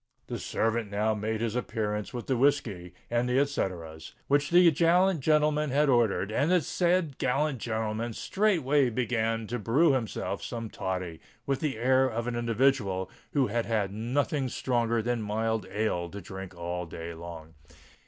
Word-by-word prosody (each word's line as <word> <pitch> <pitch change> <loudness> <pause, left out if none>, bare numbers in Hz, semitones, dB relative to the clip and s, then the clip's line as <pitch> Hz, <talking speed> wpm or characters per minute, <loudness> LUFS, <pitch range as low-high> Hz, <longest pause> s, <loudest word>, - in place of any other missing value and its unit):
The - - -5
servant 115 -1 -1
now 105 +2 +1
made 110 +1 -2
his 115 -1 -1
appearance 105 -4 -2
with 120 -1 -5
the 130 - 0
whiskey 115 -10 0 0.2
and 120 +1 +1
the 125 - +2
et 140 +1 +3
ceteras 80 - -4
which 145 +1 +2
the 175 -1 +7
gallant 175 +3 +3
gentleman 150 +1 +2
had 145 +2 +2
ordered; 115 -5 +2
and 140 +8 +1
the 180 -1 +4
said 170 -1 0
gallant 135 +1 0
gentleman 110 +1 -2
straightway 150 - +2
began 115 -2 -1
to 120 +3 -3
brew 135 +10 +3
himself 115 -5 -2
some 115 -2 -5
toddy, 90 -3 -4 0.3
with 135 -1 0
the 150 -7 -2
air 130 +3 +3
of 115 0 -3
an 120 -1 -2
individual 115 -5 +1 0.2
who 140 -3 +3
had 115 +1 -1
had 105 -4 0
nothing 130 +5 -1
stronger 115 -2 0
than 120 0 -1
mild 110 +1 -1
ale 95 -4 -1
to 100 - -7
drink 95 0 -8
all 85 0 -4
day 85 +1 -7
long. 80 -1 -9
115 Hz, 165 wpm, -28 LUFS, 105-135 Hz, 0.3 s, the